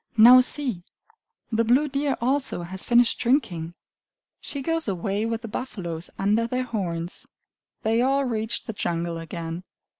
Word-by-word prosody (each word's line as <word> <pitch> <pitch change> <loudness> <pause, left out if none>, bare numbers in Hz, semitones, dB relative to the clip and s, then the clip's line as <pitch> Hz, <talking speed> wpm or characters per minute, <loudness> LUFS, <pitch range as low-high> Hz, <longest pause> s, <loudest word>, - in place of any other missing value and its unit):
Now 245 +3 +9
see! 250 -7 0 0.7
The 225 0 +2
blue 255 +6 +3
deer 280 0 -1
also 260 -7 0
has 190 +2 -5
finished 240 -1 +4
drinking. 215 - 0 0.6
She 280 -2 -5
goes 330 0 -1
away 200 +3 -1
with 230 0 -3
the - - -5
buffaloes, 175 -8 -5
under 210 +4 +2
their 255 +2 -1
horns. 180 -8 -4 0.6
They 225 +2 +2
all 275 +2 +2
reach 225 -2 -2
the 225 - -6
jungle 170 -3 -2
again. 165 +1 -6
225 Hz, 145 wpm, -25 LUFS, 175-255 Hz, 0.7 s, Now